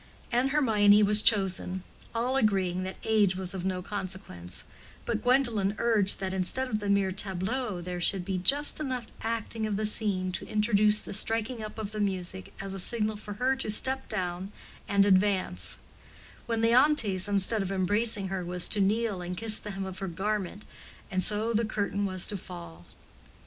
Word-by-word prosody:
And 245 +3 +2
Hermione 215 -7 +4
was 210 +1 +5
chosen; 190 -4 +2 0.3
all 245 +3 0
agreeing 190 -7 +1
that 185 0 -5
age 210 -4 +2
was 185 -1 -2
of 185 -2 -5
no 185 -1 -2
consequence, 185 - -6 0.4
but - - -2
Gwendolen 235 -6 +2
urged 215 -4 +2
that 190 -1 -3
instead 190 +8 -1
of 215 -4 -2
the 205 -1 -4
mere 200 -1 +2
tableau 195 +2 -3
there 180 0 -5
should 180 0 +3
be 190 -1 -2
just 285 - +3
enough 255 -5 -3 0.2
acting 225 -1 -3
of 205 -2 -2
the 215 - -1
scene 200 -4 0
to 180 - -4
introduce 210 0 +2
the - - -7
striking 225 +3 0
up 215 0 -8
of 215 -2 -5
the 215 - -5
music 190 -2 -2
as 195 0 -5
a 195 - -4
signal 215 +2 +1
for 210 0 -8
her 255 +5 0
to 265 - -4
step 265 +5 +2
down 185 -1 -3 0.4
and 200 0 +3
advance; 185 - +1 0.7
when 230 -1 -1
Leontes, 230 -5 +3
instead 205 +2 +1
of 195 0 -3
embracing 200 +2 0
her, 190 -1 -3
was 180 0 +1
to 210 - +1
kneel 210 -1 0
and 180 0 -5
kiss 220 0 +4
the 210 - -8
hem 195 -1 -5
of 190 0 -7
her 195 - -4
garment, 200 +2 -3 0.5
and 185 -1 0
so 215 +4 0
the 225 +1 +1
curtain 205 -2 -2
was 185 -1 0
to 205 - 0
fall. 85 - -11
205 Hz, 180 wpm, -28 LUFS, 185-220 Hz, 0.7 s, was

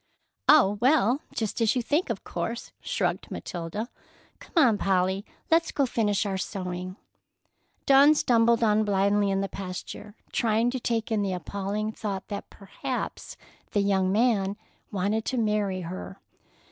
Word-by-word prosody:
"Oh, 210 -10 +6
well, 260 0 +3
just 220 +1 -2
as 225 +1 +3
you 250 - 0
think, 295 +7 0
of 225 -4 -3
course," 230 +7 -4
shrugged - - -2
Matilda. 175 +6 -5 0.5
"Come - - -16
on, 245 -9 +5
Polly; 190 0 +1 0.3
let's 330 0 +3
go 280 - +1
finish 210 -4 0
our 195 -2 -2
sewing." 185 -2 -4 0.9
Dawn 280 +3 +7
stumbled 235 -3 +3
on 215 -1 +3
blindly 200 0 +2
in 195 0 +1
the 195 - -1
pasture, 195 +2 -7 0.2
trying 230 +1 +2
to 260 - -3
take 230 -1 -1
in 215 -2 +2
the 195 -2 -1
appalling 200 +4 -3
thought 200 -3 -5
that 200 - -5
perhaps 250 +6 -6 0.4
the 205 - +3
young 190 -2 +2
man 205 -3 +2 0.3
wanted 205 +2 0
to 260 - -1
marry 210 -4 0
her! 185 +2 -7
210 Hz, 145 wpm, -27 LUFS, 195-235 Hz, 0.9 s, Dawn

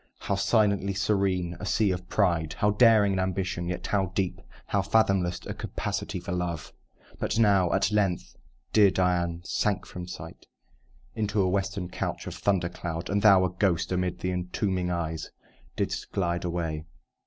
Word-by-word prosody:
How - - -3
silently 100 -1 +2
serene 95 -3 0
a - - -5
sea 105 +1 +2
of 90 0 -5
pride! 85 -6 +1
How 105 - +2
daring 105 -2 +5
an 95 - 0
ambition; 95 -1 -2
yet 90 - -4
how 95 -2 +1
deep 95 -3 -1 0.2
How 100 - +1
fathomless 95 -3 +2
a - - -4
capacity - - -4
for - - -6
love! 85 -3 -3 0.5
But - - -1
now, 100 -6 +4
at - - +2
length, 100 -4 0 0.4
dear 105 -2 +7
Dian 90 -2 0
sank 100 +1 0
from 90 -1 -8
sight, 80 -2 -9 0.7
Into 105 -1 -1
a 95 - +3
western 95 -1 -1
couch - - -4
of - - -5
thunder 95 -4 +1
cloud; 85 0 -5
And 100 0 +1
thou, 95 -3 +6
a 90 - -1
ghost, 90 -2 0
amid 90 -1 -1
the 90 - -1
entombing 90 +1 -1
trees 80 -3 -3 0.5
Didst - - -3
glide 85 -2 -1
away. 80 -3 -2
95 Hz, 165 wpm, -27 LUFS, 90-100 Hz, 0.7 s, dear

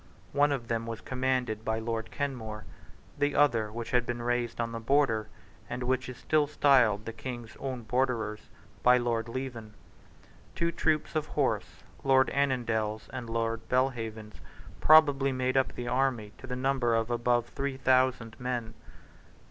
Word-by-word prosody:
One 145 +1 +3
of 125 -5 -2
them 115 0 -2
was 115 -1 -4
commanded 125 -4 -1
by 110 0 -1
Lord 115 0 -3
Kenmore; 115 -7 -4 0.5
the 145 0 +1
other, 115 -7 +3
which 115 +1 -6
had 125 -1 +3
been 120 0 -4
raised 120 -1 -1
on 115 0 -1
the 115 - -4
Border, 115 -3 +2 0.4
and 125 +1 -4
which 130 +1 0
is 125 - -8
still 155 -2 +2
styled 125 -8 +4
the 115 - -5
King's 120 -1 -7
own 130 -3 -4
Borderers, 110 -3 -1 0.3
by 125 0 +6
Lord 120 -2 -1
Leven. 115 -4 -6 0.8
Two 170 0 0
troops 155 -1 0
of 155 - 0
horse, - - -1 0.2
Lord 130 -1 +4
Annandale's 115 -6 0
and 120 -2 -5
Lord 115 0 -2
Belhaven's, 115 -4 -1 0.4
probably 145 -3 +6
made 130 0 -1
up 135 0 +2
the 120 - -5
army 125 -5 0
to 130 - -10
the 125 - -3
number 130 -2 +1
of 115 +1 0
above 120 0 +1
three 140 -1 -3
thousand 130 -3 +2
men. 120 -3 -3
120 Hz, 155 wpm, -29 LUFS, 115-130 Hz, 0.8 s, by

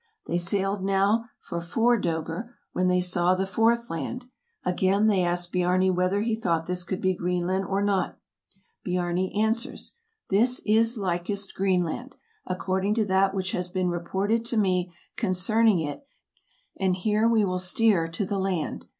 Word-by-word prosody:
They 175 - -1
sailed 195 +2 -1
now 195 +4 +2
for 170 - -5
four 230 +8 +2
"dcegr," 165 +8 -3 0.2
when 185 0 +1
they 180 0 +3
saw 180 0 +2
the 190 +1 -1
fourth 225 +4 +1
land. 165 - -4 0.4
Again 190 +3 +2
they 200 -4 +3
asked 175 0 -1
Biarni 180 +1 +2
whether 185 +3 +1
he 225 +1 0
thought 170 -7 -1
this 180 0 -2
could 180 +2 -4
be 185 0 +2
Green 180 0 -1
land 190 +2 0
or 195 +1 0
not. 200 -2 0 0.7
Biarni 180 0 -1
answers, 220 +2 -1 0.4
"This 240 +6 +3
is 225 +2 +3
likest 195 +1 -2
Greenland, 190 - -1 0.3
according 190 +2 -1
to 220 -2 +1
that 190 0 +2
which 190 -1 -1
has 180 0 -2
been 185 0 -1
reported 195 +6 -1
to 230 0 -1
me 185 -3 +1 0.3
concerning 215 +1 +3
it, 155 - -4 0.8
and 190 -2 +2
here 210 +4 +1
we 220 -3 +3
will 185 -1 -1
steer 185 -1 +2
to 165 +5 -3
the 195 +1 -2
land. 190 -4 -2
190 Hz, 160 wpm, -26 LUFS, 180-210 Hz, 0.8 s, they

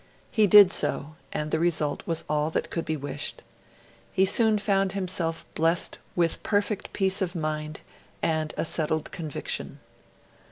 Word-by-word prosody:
He 215 -3 +3
did 200 -1 +8
so, 150 +2 0 0.2
and 150 0 -3
the 160 - +1
result 160 -4 0
was 165 -1 0
all 150 0 0
that - - -3
could 165 - -3
be 155 0 -2
wished. 145 0 -2 0.7
He 190 - +3
soon 215 +2 +4
found 195 -2 0
himself 180 -4 -2
blessed 165 +2 +2 0.2
with 170 -2 +1
perfect 205 0 -1
peace 195 0 +1
of 180 -1 -2
mind, 155 -1 -4 0.4
and 155 -1 -1
a - - -1
settled 155 -1 -1
conviction. 155 -5 -3
165 Hz, 150 wpm, -26 LUFS, 155-195 Hz, 0.7 s, did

